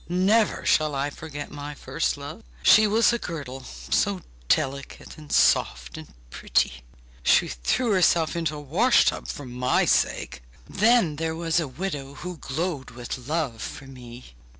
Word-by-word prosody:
Never 195 +5 +2
shall 155 -2 +2
I 140 +1 -1
forget 145 -1 -8
my 145 0 -7
first - - -2
love! - - -8 0.2
She 215 0 +7
was 225 +3 +3
a 235 - -1
girdle, 135 - -6
so 195 +7 -1 0.3
delicate 140 - -2
and 150 -1 -13
soft 65 -1 +2
and - - -10 0.2
pretty! 60 0 0 0.4
She - - +4
threw 215 - -1
herself 170 -4 +3
into 165 -3 -1
a - - -6
wash 175 - +3
tub - - -1
for 145 - -6
my 125 0 +1
sake! - - 0 0.3
Then 210 -7 +3
there 160 0 -2
was 165 0 0
a 160 - -2
widow, 140 -2 -5
who 180 +5 -7
glowed 145 0 -4
with 120 +1 -7
love 150 -8 -2
for 135 - -7
me. 125 - -12
150 Hz, 155 wpm, -25 LUFS, 130-180 Hz, 0.4 s, She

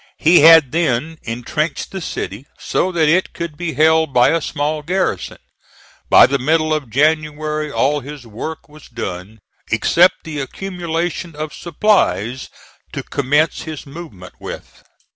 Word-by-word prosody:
He 170 +3 +5
had 160 -4 +7
then 160 -1 -1
intrenched 125 +7 -3
the 190 - -5
city, 125 - -5
so 185 - -1
that 165 -3 +2
it 175 +5 +2
could 170 -3 -5
be 165 -1 -4
held 160 +1 +3
by 120 0 +5
a 165 - +1
small 150 +1 -2
garrison. 185 +5 -2 0.7
By - - +8
the 140 0 0
middle 155 +3 +1
of 150 -6 -3
January 155 +2 0
all 145 +2 +1
his 140 -1 -10
work 115 +9 -7
was 150 0 -16
done, 95 -2 -6 0.3
except 180 +2 +3
the 155 -2 -6
accumulation 170 +1 -4
of 155 0 -5
supplies 130 - 0 0.4
to - - -4
commence 145 +3 0
his 155 -2 -7
movement 140 - -11
with. - - -9
155 Hz, 145 wpm, -18 LUFS, 140-165 Hz, 0.7 s, By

